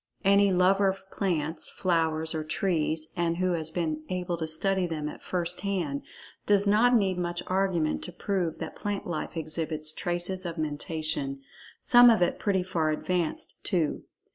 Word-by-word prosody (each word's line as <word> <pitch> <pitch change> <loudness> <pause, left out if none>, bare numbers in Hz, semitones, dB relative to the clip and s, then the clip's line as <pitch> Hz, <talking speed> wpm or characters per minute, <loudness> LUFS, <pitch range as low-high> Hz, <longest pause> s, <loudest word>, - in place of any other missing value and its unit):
Any 200 0 +5
lover 190 +2 +4
of 190 0 -3
plants, 160 -5 -1
flowers 160 -3 0
or 155 -1 -2
trees, 155 -1 0
and 170 -1 0
who 185 0 +1
has 160 -2 -2
been 160 -2 -2
able 180 -1 -2
to 160 -1 -3
study 185 +3 0
them 155 -3 -3
at - - -8
first 175 -1 -2
hand, 175 -9 -2 0.5
does 205 0 +5
not 220 +5 +4
need 190 -5 +2
much 175 0 -2
argument 185 -4 0
to 180 - -7
prove 185 -4 -2
that - - -6
plant 205 -1 -3
life 170 -1 -4
exhibits 155 -1 -1
traces 175 +3 -2
of 170 -1 -5
Mentation, 155 -2 -3 0.4
some 245 0 +7
of 220 -6 +4
it 175 - 0
pretty 190 -3 +1
far 170 -4 0
advanced, 170 +1 -2
too. 170 -6 0
175 Hz, 165 wpm, -28 LUFS, 160-190 Hz, 0.5 s, some